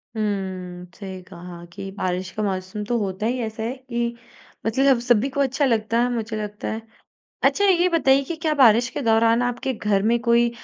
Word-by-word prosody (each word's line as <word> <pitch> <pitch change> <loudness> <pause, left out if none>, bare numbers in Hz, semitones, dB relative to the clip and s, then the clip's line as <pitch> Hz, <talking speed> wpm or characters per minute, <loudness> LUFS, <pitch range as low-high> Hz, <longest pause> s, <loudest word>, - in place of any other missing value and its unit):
हुँ, 190 -4 -3
सही 190 -2 -8
कहा 175 -1 -10
कि 195 0 -6
बारिश 185 -1 -2
का 215 - -3
मौसम 190 +1 -3
तो 240 +3 0
होता 195 0 -3
ही 250 +2 0
ऐसा 220 0 -5
है 235 +3 -2
कि 250 -3 -4 0.6
मतलब 225 +4 +1
जब 270 -3 +5
सभी 240 +1 +3
को 280 +1 -4
अच्छा 275 +1 +1
लगता 230 -2 +1
है, 245 - +2
मुझे 225 -1 -3
लगता 210 0 -6
है। 220 - -4 0.6
अच्छा, 405 - +3
ये 365 -2 +4
बताइए 275 -5 +3
कि 335 +5 -5
क्या 320 -1 0
बारिश 245 -3 +5
के 255 - -4
दौरान 230 0 +3
आपके 245 +2 -1
घर 210 -3 0
में 235 - +2
कोई 235 0 +3
225 Hz, 200 wpm, -23 LUFS, 200-255 Hz, 0.6 s, जब